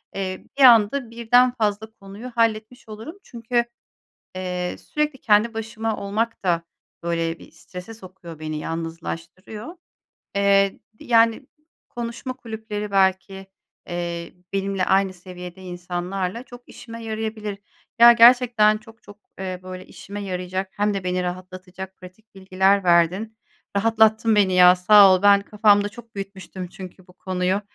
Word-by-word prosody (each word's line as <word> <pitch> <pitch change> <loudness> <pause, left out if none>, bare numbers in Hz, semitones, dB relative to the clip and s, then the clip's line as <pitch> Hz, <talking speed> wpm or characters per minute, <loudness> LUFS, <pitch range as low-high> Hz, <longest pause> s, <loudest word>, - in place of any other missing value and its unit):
Eee, 185 -1 -4
bir 280 - +4
anda 235 +1 +5
birden 245 +2 +3
fazla 215 -2 -1
konuyu 210 +4 -11
halletmiş 225 +1 -1
olurum. 220 - -9
Çünkü, 235 0 -2 0.7
eee, 180 -1 -4
sürekli 300 -3 -3
kendi 215 +1 +3
başıma 225 0 -3
olmak 215 +2 -3
da 170 -2 +1 0.4
böyle 165 -1 -2
bir - - -15
strese 180 +6 -11
sokuyor 185 -5 -12
beni, 155 -1 -5
yalnızlaştırıyor. 165 - -7 0.6
Eee, 200 -1 +3 0.2
yani, 230 +1 +2 0.4
konuşma 235 +2 -6
kulüpleri 220 -4 -6
belki, 190 0 0 0.4
eee, 170 -1 -5 0.2
benimle 195 -1 -1
aynı 190 0 +2
seviyede 180 0 -11
insanlarla 180 +3 -4
çok 245 -1 -15
işime 230 -1 -10
yarayabilir. 215 -2 -4 0.4
Ya, 235 0 +10
gerçekten 235 -3 +5
çok 225 +1 -18
çok, 205 0 -15 0.2
eee, 185 -1 -5
böyle 185 0 -9
işime 205 +1 -9
yarayacak 185 0 -4
hem 205 0 +1
de 195 -2 -4
beni 180 0 -1
rahatlatacak 185 +1 -7
pratik 185 +4 -16
bilgiler 190 +1 +1
verdin. 180 +6 +2 0.4
Rahatlattın 220 +1 +3
beni, 195 -2 +3
ya, 180 0 +7
sağ 195 +1 +7
ol. 185 - -1
Ben 200 0 +6
kafamda 205 0 +3
çok 230 +2 -14
büyütmüştüm 195 -2 -7
çünkü 185 0 -12
bu 180 - -19
konuyu. 185 +1 -2
200 Hz, 130 wpm, -22 LUFS, 185-225 Hz, 0.7 s, Ya